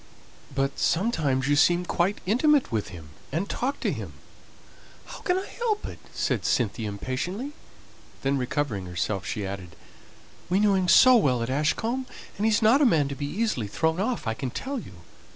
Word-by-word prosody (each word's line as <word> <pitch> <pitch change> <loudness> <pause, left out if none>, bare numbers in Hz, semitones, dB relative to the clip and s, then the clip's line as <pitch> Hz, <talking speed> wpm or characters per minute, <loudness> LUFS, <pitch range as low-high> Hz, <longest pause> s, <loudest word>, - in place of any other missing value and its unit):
"But 135 0 -1
sometimes 155 - +1
you 145 - +3
seem 175 +4 +4
quite 180 +4 0
intimate 275 - +3
with 110 -3 -1
him, 85 -4 -10 0.2
and 170 +7 -1
talk 270 +6 -2
to - - +1
him - - -7 0.5
" - - -24
"How - - -9
can 360 0 0
I 380 - -3
help 445 -3 -2
it?" - - -8
said - - -1
Cynthia 110 -2 0
impatiently. 155 - -4 0.7
Then 135 +1 +2
recovering 125 -7 -2
herself 90 +2 -2
she 105 - -3
added: 95 -3 -7 0.7
"We 185 +2 +3
knew 205 -1 +4
him 185 -1 +1
so 255 +9 +8
well 130 - +2
at 115 - -3
Ashcombe, 225 - 0 0.3
and 210 +3 0
he's 220 0 +2
not 235 +7 +5
a - - +6
man 150 -9 +2
to 140 - -4
be 145 0 -4
easily 195 - -1
thrown 160 - 0
off, 230 - -1
I 115 - 0
can 130 +3 -4
tell 270 - -4
you. 205 - -11
160 Hz, 185 wpm, -26 LUFS, -, 0.7 s, so